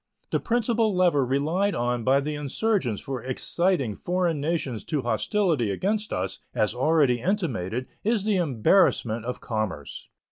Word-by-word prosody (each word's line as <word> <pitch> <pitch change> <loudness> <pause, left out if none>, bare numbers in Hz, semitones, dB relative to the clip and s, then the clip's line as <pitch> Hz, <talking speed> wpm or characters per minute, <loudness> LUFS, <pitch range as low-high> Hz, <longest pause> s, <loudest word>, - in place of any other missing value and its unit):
The - - +2
principal 230 -3 +1
lever 175 -6 +3
relied 155 +10 0
on 120 0 -1
by 135 +3 +3
the 150 +2 -3
insurgents 145 - -1
for 130 -3 -5
exciting 135 - 0
foreign 175 - -1
nations 145 -7 -2
to 150 -5 -2
hostility 130 - +1
against 210 - -1
us, 95 +1 -3 0.2
as 105 - +1
already 135 -2 +2
intimated, 130 - -1 0.2
is 215 -2 +1
the 210 -3 +2
embarrassment 120 - +2
of 125 - -4
commerce. 110 - -4
145 Hz, 140 wpm, -26 LUFS, 120-185 Hz, 0.2 s, lever